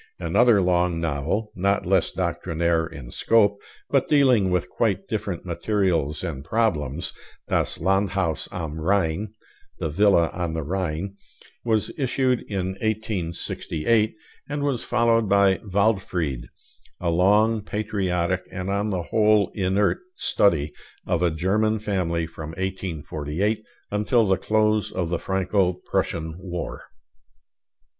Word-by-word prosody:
Another 120 -5 +4
long 90 -1 +2
novel, 85 +7 -1
not 100 +2 +1
less 95 -1 +2
doctrinaire 85 -2 0
in 70 -7 -10
scope, 100 -3 +3 0.3
but - - +1
dealing 130 -9 +4
with 90 -3 0
quite - - -1
different - - -3
materials 90 -8 0
and 75 -7 -4
problems, 85 - -1 0.4
'Das - - 0
Landhaus 95 -2 0
am 80 -2 -5
Rhein' 95 +2 +1 0.5
(The 80 - -2
Villa 90 -1 +4
on 85 -2 -3
the 80 - -2
Rhine), 90 +3 -3 0.5
was 110 -3 +1
issued 130 -2 +1
in 95 -2 -1
1868; 110 0 -1 0.3
and 145 0 -2
was 140 -5 0
followed 115 -2 +2
by 100 -1 +4
'Waldfried,' 95 - 0 0.5
a 85 -1 0
long, 105 +6 +3
patriotic, 95 -4 -1
and 95 +1 -4
on 100 +2 0
the 90 -4 -1
whole 105 0 +3
inert, 95 +1 +1 0.2
study 80 - +2 0.3
of 90 -2 0
a 90 - +3
German 100 +7 +1
family 90 -6 -1
from 80 -1 -8
1848 95 +1 -2 0.3
until 105 +3 +2
the 95 -1 +3
close 110 -1 +1
of 90 -3 -2
the 85 -1 -1
Franco 95 -1 +1
Prussian 80 -2 -3
War. 90 -2 -5
95 Hz, 120 wpm, -24 LUFS, 85-105 Hz, 0.5 s, Another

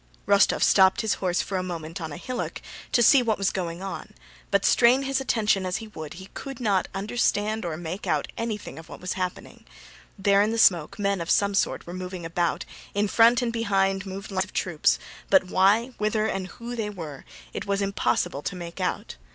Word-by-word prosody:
Rostóv 200 0 +4
stopped 190 +3 +5
his 220 -2 +1
horse 180 -2 +1
for 195 - -3
a - - -1
moment 170 -1 -6
on 160 -1 -5
a 145 - -6
hillock 250 +7 -4 0.3
to 240 - +4
see 265 +3 +7
what 225 -3 0
was 195 -1 +1
going 175 -1 -4
on, 195 - -7 0.3
but 200 -1 +2
strain 250 +3 +5
his 270 0 0
attention 215 -6 +1
as 185 +1 -1
he 220 -1 -8
would 155 -7 -8
he 190 +2 -11
could 270 -1 -7
not 200 -6 +1
understand 210 +1 0
or 165 -3 -3
make 175 +4 -6
out - - 0
anything 225 -6 -4
of 160 - -13
what - - -9
was 180 - -3
happening: 185 -1 -5 0.5
there 200 0 +4
in 210 - +2
the 230 - -1
smoke 175 -8 +4
men 200 -3 0
of 170 - -5
some 200 0 +3
sort 195 - 0
were 175 - -8
moving 180 -1 -6
about, 170 +1 -1 0.3
in 205 +1 +2
front 235 +4 +5
and 235 -1 -1
behind 195 -3 +1
moved 195 +1 -7
lines 190 -1 0
of - - -17
troops; 170 -5 +1 0.3
but 190 -1 +6
why, 205 +7 +4
whither, 215 +1 +1
and 195 -4 -2
who 235 +4 -7
they 220 -3 -2
were, 160 -9 -8 0.3
it - - -5
was 200 0 0
impossible 170 -8 0
to 185 - -4
make 175 0 -8
out. 180 - -3
195 Hz, 210 wpm, -26 LUFS, 180-220 Hz, 0.5 s, see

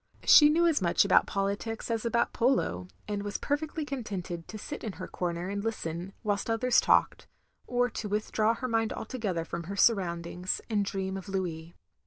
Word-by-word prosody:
She 295 -1 +9
knew 335 +3 +3
as 320 -9 +3
much 170 +2 +3
about 200 - +4
politics 200 +4 -2
as 230 0 -1
about 235 0 +1
polo, 230 - +1 0.2
and 205 -1 -2
was 205 0 -3
perfectly 295 +1 -2
contented 195 - -5
to 220 - -7
sit 295 +7 -7
in 215 -4 -4
her - - -7
comer 175 0 -3
and 200 0 -3
listen, 180 -4 -4
whilst 205 0 -1
others 235 +2 +3
talked; - - +2 0.4
or 245 0 +2
to 220 -2 -5
withdraw 215 +2 +1
her 255 - -4
mind 225 -2 0
altogether 205 -9 -3
from 170 0 -5
her 200 +4 -5
surroimdings, 180 -3 +1
and 205 -2 +2
dream 190 -1 -3
of 195 +1 -8
Louis. 170 -4 -4
205 Hz, 180 wpm, -29 LUFS, 180-230 Hz, 0.4 s, She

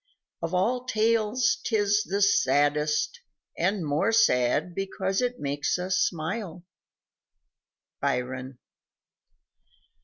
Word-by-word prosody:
Of 165 +2 -2
all 245 +7 0
tales 225 0 +1
'tis 205 -2 +2
the 200 -1 0
saddest 150 - +2 0.3
and 185 0 0
more 145 +9 +1
sad 175 - +2
Because 190 +1 -2
it 245 0 -2
makes 145 +3 -1
us 185 +1 -1
smile. 180 +1 -2 1.4
_Byron. 130 +1 -2
190 Hz, 90 wpm, -26 LUFS, 150-215 Hz, 1.4 s, tis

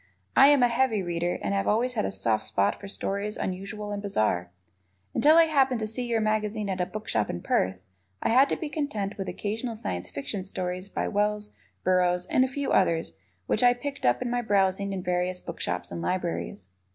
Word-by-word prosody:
I 275 - +8
am 285 -3 +5
a - - +6
heavy 235 -4 +1
Reader 175 0 -1
and - - -1
have 195 0 0
always 240 +4 +2
had 215 -3 0
a - - -2
soft 115 - +1
spot 100 - +3
for 200 - -8
stories 200 +1 -3
unusual 200 +3 -4
and 205 0 -3
bizarre. 110 - 0 0.6
Until 310 +3 +5
I 335 - +9
happened 270 -6 +2
to 220 - -2
see 240 +3 -3
your 230 -1 +1
magazine 215 -1 -1
at 185 -1 -1
a 180 - 0
bookshop 210 - -2
in 85 - -4
Perth, 95 0 +1 0.5
I - - +1
had 265 +4 +5
to - - +1
be 315 - -4
content 275 -10 -3
with 190 - -3
occasional 225 +5 -3
Science 90 - -4
Fiction 185 +8 -4
stories 185 0 -4
by - - -2
Wells, 210 +1 0 0.3
Burroughs, 180 -1 +2
and 255 - +3
a - - +2
few 280 +2 -3
others 165 -3 +2 0.3
which 215 - +1
I 245 0 +5
picked 275 +3 -6
up 120 0 +2
in 240 - -3
my 245 0 +1
browsing 200 -2 +1
in 190 -2 -4
various 180 0 -1
bookshops 90 - -4
and 85 -1 -4
libraries. 165 - -3
200 Hz, 205 wpm, -27 LUFS, 180-235 Hz, 0.6 s, I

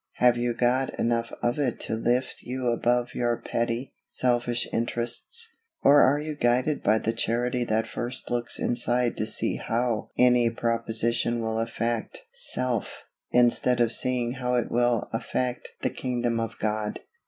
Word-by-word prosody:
Have 125 -1 +4
you 120 0 -1
got 125 +2 +1
enough 115 0 0
of 120 +4 +1
it 130 -5 0
to - - -2
lift 120 +3 0
you 125 0 -2
above 120 +1 +1
your 120 -1 0
petty, 120 +2 -2
selfish 120 -1 0
interests, 120 - -1 0.4
or 145 +1 +7
are 140 +3 +5
you 150 0 -4
guided 125 +3 +1
by 110 - +3
the 115 +1 -1
Charity 120 +2 0
that 110 0 +1
first 120 +3 -3
looks 120 -1 -1
inside 120 0 +1
to 110 - -1
see 110 +1 0
how 115 -1 -1
any 125 -1 +5
proposition 115 0 0
will 110 0 -1
affect 115 0 -2
self, 125 -4 -2 0.3
instead 125 0 +3
of 120 -1 +3
seeing 125 -1 0
how 125 -1 -1
it 120 - 0
will 120 -2 +2
affect 125 +2 -2
the - - +1
kingdom 120 -2 -1
of 115 -1 -4
God? 105 0 -2
120 Hz, 155 wpm, -26 LUFS, 115-125 Hz, 0.4 s, or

